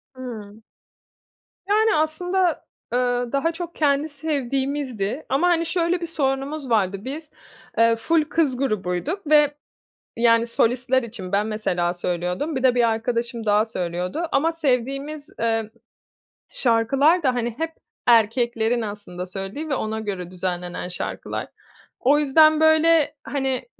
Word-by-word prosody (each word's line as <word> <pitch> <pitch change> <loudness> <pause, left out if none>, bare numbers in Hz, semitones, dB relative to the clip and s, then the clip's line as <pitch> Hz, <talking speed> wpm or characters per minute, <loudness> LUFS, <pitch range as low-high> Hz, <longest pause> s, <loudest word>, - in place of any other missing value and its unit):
Hıı. 220 -5 -8 1.1
Yani 430 +1 +4
aslında, 345 +2 0 0.3
eee, 245 - +3 0.3
daha 280 +4 +1
çok 340 0 -7
kendi 290 0 +1
sevdiğimizdi. 275 -4 -2
Ama 275 +7 +2
hani 340 -1 +2
şöyle 345 +1 0
bir - - -2
sorunumuz 275 -2 -2
vardı, 200 -4 +2
biz, 300 +4 -6 0.5
eee, 230 0 +5
ful 315 +8 +2
kız 300 -4 0
grubuyduk 260 - -2
ve 295 -1 +5 0.6
yani 230 0 +4
solistler 250 +3 +1
için 210 -5 -7
ben 205 +1 +2
mesela 180 -5 -1
söylüyordum, 180 - -2
bir 260 - -1
de 255 -2 +4
bir 240 -2 +3
arkadaşım 230 0 -2
daha 210 +1 +4
söylüyordu. 180 - -3
Ama 320 +4 +2
sevdiğimiz, 285 +1 -2
eee, 225 -1 0 0.8
şarkılar 275 +8 +2
da 260 -2 +3
hani 240 -1 -2
hep 325 +1 -2 0.4
erkeklerin 235 0 +3
aslında 205 -4 -6
söylediği 195 - -6
ve 280 - +1
ona 220 -2 -2
göre 190 -5 -5
düzenlenen 180 -1 -4
şarkılar. 180 - -5 0.5
O 285 +4 +4
yüzden 310 +2 +5
böyle, 315 0 +4
hani 265 -2 -2
255 Hz, 130 wpm, -23 LUFS, 220-305 Hz, 1.1 s, eee